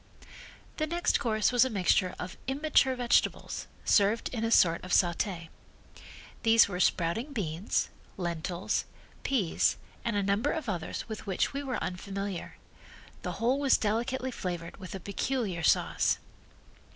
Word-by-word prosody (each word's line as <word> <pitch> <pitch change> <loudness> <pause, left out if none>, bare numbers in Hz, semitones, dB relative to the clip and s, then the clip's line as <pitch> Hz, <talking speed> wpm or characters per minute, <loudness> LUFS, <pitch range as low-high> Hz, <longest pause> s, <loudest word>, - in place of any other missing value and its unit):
The 310 - 0
next 345 +2 +1
course 215 -1 +1
was 245 -1 +5
a 260 - 0
mixture 185 -3 +2
of 180 +1 -6
immature 270 -1 +3
vegetables, 245 -1 +1 0.2
served 205 +2 +3
in 230 -3 -3
a 225 - +1
sort 170 -7 +4
of 185 - -7
saute. 175 -1 +1 0.9
These 225 -1 +6
were 180 -3 -4
sprouting 185 - +1
beans, 180 - -1 0.3
lentils, 175 0 -2 0.4
peas 225 -12 +1 0.3
and 230 -2 -1
a 205 - +1
number 200 +8 +1
of 315 -6 -4
others 175 -6 -3
with 220 -1 -7
which 190 +6 0
we 280 - -2
were 265 -3 -2
unfamiliar. 195 0 -5 0.6
The - - -3
whole 250 +4 +1
was 280 -2 +4
delicately 240 +5 -1
flavored 175 -6 -5
with 190 0 -8
a - - -5
peculiar 200 -2 -2
sauce. - - +2
210 Hz, 140 wpm, -30 LUFS, 180-250 Hz, 0.9 s, These